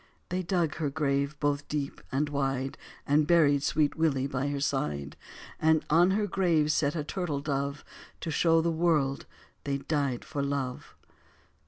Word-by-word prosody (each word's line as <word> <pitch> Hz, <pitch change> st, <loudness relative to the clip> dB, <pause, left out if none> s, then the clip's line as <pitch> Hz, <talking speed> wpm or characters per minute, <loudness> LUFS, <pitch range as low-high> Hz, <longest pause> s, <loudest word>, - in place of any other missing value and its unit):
They 180 Hz, +1 st, -1 dB
dug 175 Hz, -3 st, 0 dB
her 155 Hz, -3 st, -1 dB
grave 140 Hz, 0 st, -1 dB
both 145 Hz, -1 st, 0 dB
deep 145 Hz, -2 st, -3 dB
and 145 Hz, +3 st, +1 dB
wide 135 Hz, -2 st, -1 dB, 0.3 s
And 150 Hz, +1 st, +3 dB
buried 150 Hz, -4 st, +4 dB
sweet 145 Hz, 0 st, +1 dB
Willie 150 Hz, -5 st, +1 dB
by 135 Hz, 0 st, -2 dB
her 145 Hz, 0 st, -2 dB
side; 75 Hz, -, -2 dB, 0.5 s
And 160 Hz, 0 st, +3 dB
on 170 Hz, +4 st, +5 dB
her 210 Hz, -, +1 dB
grave 170 Hz, -6 st, +2 dB
set 145 Hz, 0 st, +1 dB
a 155 Hz, -, -1 dB
turtle 155 Hz, -2 st, -3 dB
dove 140 Hz, 0 st, -3 dB, 0.4 s
To 160 Hz, -, -3 dB
show 165 Hz, +1 st, +3 dB
the 170 Hz, +1 st, +1 dB
world 160 Hz, -5 st, +1 dB, 0.4 s
they 140 Hz, -1 st, -1 dB
died 140 Hz, -3 st, -1 dB
for 145 Hz, -2 st, -3 dB
love. 140 Hz, -2 st, -3 dB
145 Hz, 160 wpm, -29 LUFS, 140-160 Hz, 0.5 s, on